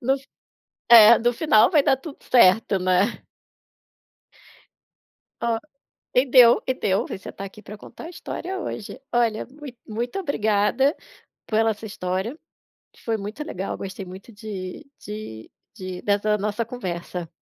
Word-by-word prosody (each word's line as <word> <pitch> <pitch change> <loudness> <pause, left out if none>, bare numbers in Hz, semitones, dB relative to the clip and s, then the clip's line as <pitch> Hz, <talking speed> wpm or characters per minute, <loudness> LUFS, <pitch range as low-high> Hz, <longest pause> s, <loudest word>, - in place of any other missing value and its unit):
No 265 +2 +2
f 275 0 -9 0.6
é 235 -1 +9
no 240 +1 +1
final 235 -4 +4
vai 305 -5 +4
dar 270 - +3
tudo 280 +2 -10
certo, 200 -3 +4
né? 185 +4 +1 2.2
Ó, 235 -1 +1 0.6
e 250 +2 +5
deu 245 -3 +7
e 260 - +2
deu, 200 -6 0
você 190 - -7
tá 195 - -8
aqui 195 +2 -12
pra 210 0 -10
contar 230 - -12
a - - -7
história 370 +2 -6
hoje. 215 - -6
Olha, 230 -3 +1
mui 275 -1 -11
muito 235 - -4
obrigada 230 - +1 0.5
pela 225 0 +2
sua 215 +2 -10
história, 190 - -3 0.7
foi 225 -1 -1
muito 215 +8 -6
legal, 195 - -5
gostei 195 0 -7
muito 190 +5 -11
de 205 +2 -7
de 210 - -8 0.3
de 185 -3 -7
dessa 210 +1 +1
nossa 210 +2 -2
conversa. 180 -7 -6
220 Hz, 140 wpm, -23 LUFS, 195-250 Hz, 2.2 s, é